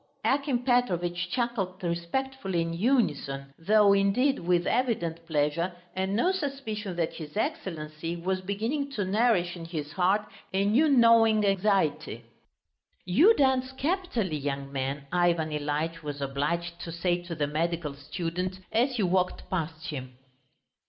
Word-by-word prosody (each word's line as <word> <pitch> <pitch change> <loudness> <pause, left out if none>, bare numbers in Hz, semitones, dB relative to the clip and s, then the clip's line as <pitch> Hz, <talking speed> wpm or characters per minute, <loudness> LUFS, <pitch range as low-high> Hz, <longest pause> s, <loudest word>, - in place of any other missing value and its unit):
Akim 275 -3 +1
Petrovitch 180 -8 +1
chuckled 205 -6 -2
respectfully 180 +3 -2
in 165 0 -3
unison, 150 - 0
though, 205 +3 +5
indeed, 205 +8 +2
with 175 0 +1
evident 175 -10 0
pleasure 160 +3 0 0.2
and 190 +1 -1
no 350 - +3
suspicion 270 - -4
that 170 -2 -1
his 155 +3 -8
Excellency 165 - -3
was 185 +2 -2
beginning 225 +10 -2
to 205 -6 -1
nourish 195 -3 +2
in 170 -2 -8
his 155 -3 -5
heart 190 +5 +2 0.3
a 195 +1 +2
new 260 +10 +4
gnawing 230 -4 +5
anxiety. 195 -4 +1 0.8
"You 320 - +5
dance 265 -1 +2
capitally, 265 - -1
young 140 -1 -4
man," 140 +1 -3
Ivan 170 -3 +2
Ilyitch 150 +3 -2
was 145 -2 -5
obliged 160 +5 -2
to 165 - -6
say 175 +1 0
to 175 -1 -6
the 150 -2 0
medical 160 0 -2
student 170 +6 -4
as 250 +4 +2
he 220 - +1
walked 180 0 0
past 160 -3 -3
him. 130 -3 -7
180 Hz, 140 wpm, -28 LUFS, 165-225 Hz, 0.8 s, though